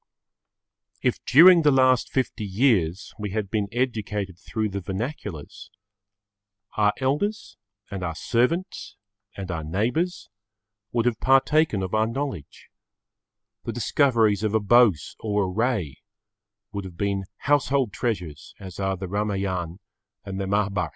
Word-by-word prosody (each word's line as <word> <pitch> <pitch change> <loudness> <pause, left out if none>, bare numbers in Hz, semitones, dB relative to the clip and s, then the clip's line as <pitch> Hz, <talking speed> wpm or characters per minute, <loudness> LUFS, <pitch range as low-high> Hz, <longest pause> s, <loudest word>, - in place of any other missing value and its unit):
If - - 0
during 170 +5 +8
the 150 - +4
last 130 -2 +3
fifty 125 -4 -2
years 100 -4 +1
we 105 -1 -3
had 100 -1 -3
been 105 -2 0
educated 105 -7 -2
through 110 +2 -3
the 100 0 -4
vernaculars, 95 - -6 1.1
our 105 -1 +3
elders 150 - -2 0.4
and 100 -2 -5
our 85 -3 -3
servants 145 - -1 0.4
and 95 -2 -5
our 80 -2 -4
neighbours 120 - -2 0.6
would 120 -1 0
have 120 -3 +1
partaken 135 -4 +3
of 95 - -5
our 110 0 +2
knowledge; 125 - -6 0.9
the 115 - -3
discoveries 115 -3 +2
of 110 0 0
a - - +4
Bose 105 - +3
or 105 -2 0
a - - -1
Ray 95 - -1 0.7
would 100 -2 -5
have 90 -2 -10
been 100 0 -1
household 140 -5 +1
treasures 90 - -4
as 95 -3 -9
are 95 -1 -1
the 95 +1 -5
Ramayan 95 -4 -2 0.5
and 100 0 -4
the 95 - -3
Mahabharat. 100 -4 0
105 Hz, 135 wpm, -24 LUFS, 95-125 Hz, 1.1 s, during